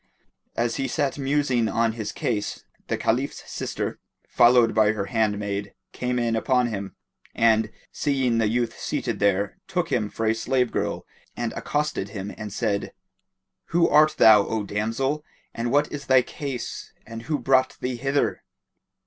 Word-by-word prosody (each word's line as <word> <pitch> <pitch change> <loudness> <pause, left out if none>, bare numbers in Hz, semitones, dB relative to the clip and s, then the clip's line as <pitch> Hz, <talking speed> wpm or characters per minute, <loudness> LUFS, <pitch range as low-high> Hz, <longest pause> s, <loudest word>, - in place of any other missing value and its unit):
As 115 -1 0
he 135 - -1
sat 145 -2 -1
musing 135 -4 +1
on 115 0 +1
his 110 -2 -5
case, 120 -8 -3 0.2
the - - -1
Caliph's - - -1
sister, - - -4 0.3
followed 120 -1 +5
by 110 0 +4
her 100 -2 -3
handmaid, 105 -3 -1 0.2
came 125 0 -2
in 120 -1 +1
upon 125 +1 +2
him; 100 -3 -5 0.4
and, 110 -1 +3 0.2
seeing 130 -5 +1
the 110 - +2
youth 120 +1 0
seated - - -2
there 100 0 +1
took 180 -3 -2
him 110 -5 +1
for 115 - -3
a 110 - +3
slave 125 +2 0
girl - - -2 0.3
and 120 -1 -2
accosted 150 -9 -2
him 100 -1 -6
and 105 -2 -7
said, 100 -1 -2 0.7
"Who 170 0 +3
art 155 +1 +5
thou 105 -2 +7
O 110 -2 -1
damsel? 115 +9 -1 0.3
and 115 +1 -2
what 145 +2 +2
is 140 -1 -6
thy 130 -1 +5
case 135 -1 -6
and 115 0 -8
who 150 - +2
brought 130 -1 +2
thee 125 -1 -3
hither?" 135 +3 0
120 Hz, 155 wpm, -24 LUFS, 110-135 Hz, 0.7 s, thou